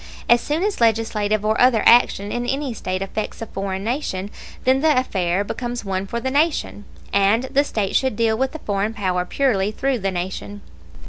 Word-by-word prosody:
As 235 0 +5
soon 310 +4 -1
as 415 - -1
legislative 215 -2 +1
or 215 +1 +1
other 245 -3 +4
action 210 -4 +5
in 240 0 -2
any 270 -1 -2
State 185 -3 -3
affects 210 +2 -5
a 225 - -4
foreign 195 -2 -4
nation, 210 -5 -3 0.3
then 260 +1 +3
the 310 -3 +3
affair 190 -6 0
becomes 240 +2 -5
one 190 0 -2
for 235 - -3
the 260 +2 -3
Nation, 290 -8 0 0.3
and 200 +4 +3
the 275 +2 +1
State 210 -8 -2
should 260 -4 +2
deal 225 0 +2
with 265 +3 -1
the 315 - -6
foreign 205 -3 -2
power 185 -4 -1
purely 210 -4 +1
through 265 +3 -1
the 195 -1 -1
Nation. 190 +3 -5
220 Hz, 190 wpm, -21 LUFS, 195-255 Hz, 0.3 s, As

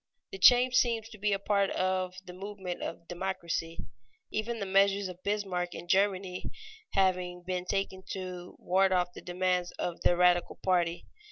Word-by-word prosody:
The 195 - -7
change 245 +5 +7
seems 230 -3 +2
to 215 -3 -12
be 210 +1 +1
a 200 - +2
part 200 0 +1
of 185 -1 -1
the 180 - -9
movement 190 -1 -6
of 170 0 -6
democracy, 170 -2 -3 0.5
even 230 +2 -2
the 200 - -2
measures 195 +1 +3
of 180 0 -9
Bismarck 190 -4 -2
in 175 - -8
Germany 190 -1 +1 0.4
having 180 -2 +1
been 180 0 -3
taken 195 0 -2
to 180 -2 -6
ward 190 +1 +2
off 180 -1 +1
the - - -9
demands 180 0 0
of 175 -1 -4
the 175 - +3
radical 180 0 +3
party. 175 -2 +1
185 Hz, 165 wpm, -30 LUFS, 180-200 Hz, 0.5 s, change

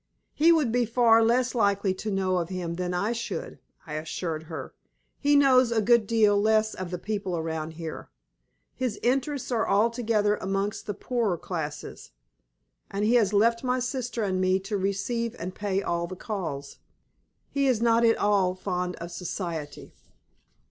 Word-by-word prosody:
"He 325 +3 +5
would 305 -8 +3
be 245 0 +2
far 230 -1 +5
less 245 +2 +2
likely 200 -4 +2
to 215 +3 -5
know 190 -2 0
of 170 -1 -2
him 180 -3 -3
than 180 +1 -3
I 180 +5 0
should," 240 - -5 0.3
I 150 - -8
assured 160 +1 -4
her. - - -7 0.5
"He 290 0 +3
knows 260 -4 +5
a 230 - +2
good 225 0 +4
deal 210 -3 +3
less 220 0 +2
of 185 -1 -5
the 180 - -3
people 195 -2 -3
around 160 -1 -3
here. 160 - -7 0.6
His 250 -5 -2
interests 265 +1 0
are 225 -2 0
altogether 215 -1 +2
amongst 195 +3 -2
the 205 - -3
poorer 225 -6 -1
classes. 150 -4 -6 0.8
And 200 +1 -1
he 225 - +3
has 220 -5 +4
left 230 +4 +3
my 255 0 +1
sister 245 -2 -2
and 185 -2 0
me 185 0 +3
to 200 +2 -4
receive 200 +5 -1
and 180 +2 -5
pay 200 -1 -2
all 170 0 -1
the 185 - -7
calls. 165 -9 -5 0.7
He 280 -1 +1
is 250 -4 +2
not 230 0 +3
at 230 -1 +4
all 195 -3 +2
fond 180 -1 -3
of 170 +1 -8
society." 170 -3 -5
205 Hz, 170 wpm, -27 LUFS, 180-235 Hz, 0.8 s, He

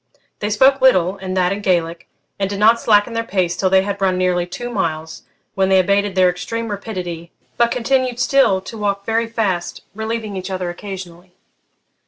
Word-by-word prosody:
They 210 - -2
spoke 265 +6 +4
little, 190 -7 +4
and 190 -1 -4
that 180 0 +2
in 200 +1 -3
Gaelic; 170 -3 -1 0.3
and 195 -1 0
did 200 - -4
not 225 +3 +4
slacken 210 +1 +3
their 230 0 -1
pace 185 -5 -1
till 190 - +1
they 190 0 +4
had 200 0 -4
run 185 -1 +2
nearly 180 -1 +1
two 240 +7 -6
miles, 160 -6 -3 0.3
when 190 -2 +1
they 190 - +5
abated 200 +1 +1
their 185 -1 +5
extreme 215 +6 -3
rapidity, 180 -5 -6 0.2
but 235 0 +3
continued 250 0 0
still 255 -9 +3
to 220 +4 -9
walk 200 -1 -2
very 225 +1 0
fast, 195 -7 -2
relieving 220 -1 -4
each 185 0 -5
other 185 -2 -3
occasionally. 180 -1 -9
195 Hz, 185 wpm, -19 LUFS, 180-225 Hz, 0.3 s, they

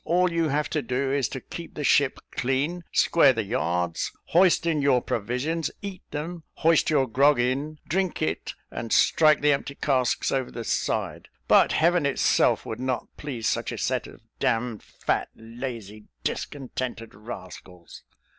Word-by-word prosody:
All 180 +2 +2
you 165 -2 +1
have 150 +2 0
to 155 - 0
do, 135 +1 -1
is 140 -4 +1
to 135 - -5
keep 170 +5 -9
the 150 - -4
ship 140 -1 +3
clean, 140 +8 -1
square 165 -5 +5
the 110 -2 -1
yards; 90 -6 -1 0.2
hoist 175 -1 +4
in 160 -3 +1
your 140 -3 +4
provisions, 125 +10 -2
eat 195 -2 -6
them; 165 +3 -5
hoist 165 -1 +3
your 145 -4 +3
grog 135 +3 +3
in, 135 +5 -1
drink 185 +1 0
it, 80 +1 -2 0.2
and 115 - -5
strike 155 -2 +4
the 150 0 +4
empty 140 0 -2
casks 130 -5 +1
over 130 -2 -1
the 115 - -6
side; - - -2 0.2
but - - +5
Heaven 170 -2 +3
itself 140 - +2
would 110 - -5
not 130 -1 -3
please 125 -7 -4
such - - -1
a - - -5
set - - -1
of - - -14 0.2
d - - +1
d 115 -1 -1
fat, - - -2
lazy, 115 -3 -7 0.2
discontented 130 -4 -4
rascals." 95 -5 -10
135 Hz, 165 wpm, -26 LUFS, 115-155 Hz, 0.2 s, square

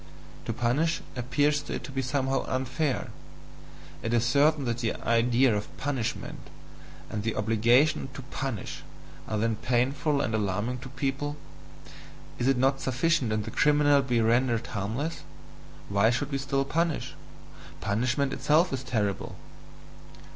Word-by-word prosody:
To - - -1
punish, 135 +8 +1
appears 145 +4 +1
to 145 - -5
it - - -5
to - - -7
be 135 0 -1
somehow 135 0 0
unfair 130 +2 -1 0.9
it 115 +1 0
is 115 0 +2
certain 145 +3 +3
that 120 -1 -1
the 115 -2 -1
idea 115 +1 +3
of 105 - -5
"punishment" 135 -5 -3 0.7
and 105 - -2
"the 110 +1 -2
obligation 120 +7 +3
to 135 - -7
punish" 130 -7 -4 0.5
are 110 - -1
then 110 0 0
painful 135 +4 +1
and 120 -5 -1
alarming 105 +4 -1
to 125 +1 -9
people. 140 +2 -2 1.0
"Is 120 - +1
it 135 -1 +3
not 135 +2 +2
sufficient 135 -1 +1
if 110 0 0
the 110 - -6
criminal 145 -1 +4
be 125 -3 +1
rendered 115 +1 +2
HARMLESS? 115 +8 -3 0.7
Why 100 +2 +3
should 135 +4 -1
we 135 - -1
still 135 0 0
punish? 165 +2 -1 0.7
Punishment 125 +7 0
itself 150 +5 +3
is 130 -1 -3
terrible!" 105 -6 -2
130 Hz, 140 wpm, -28 LUFS, 115-140 Hz, 1.0 s, criminal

